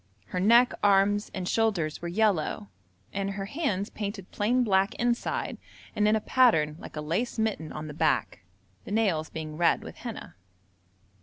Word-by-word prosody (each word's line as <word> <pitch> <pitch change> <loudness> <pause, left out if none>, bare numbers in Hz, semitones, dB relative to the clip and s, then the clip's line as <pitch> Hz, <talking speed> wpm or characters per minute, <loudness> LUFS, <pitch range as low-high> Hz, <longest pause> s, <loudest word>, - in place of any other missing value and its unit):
Her 180 - -2
neck, 235 +6 +5
arms, 205 +1 +3
and 185 -2 -4
shoulders 195 -10 0
were 170 - -4
yellow, 200 0 0 0.4
and 195 0 -2
her 195 0 -4
hands 205 - -2
painted 200 -2 -6
plain 245 +5 +1
black 195 -3 +2
inside 240 0 -1 0.4
and 210 - +2
in 215 - +4
a - - +2
pattern 160 -15 +3
like - - -10
a 150 - -3
lace 170 +13 -2
mitten 215 -8 -1
on 155 - -6
the 150 - -7
back, 150 -7 0 0.4
the - - -10
nails 195 -8 +1
being 155 -1 -6
red 170 0 +2
with - - -10
henna. - - -7
195 Hz, 165 wpm, -28 LUFS, 160-220 Hz, 0.4 s, neck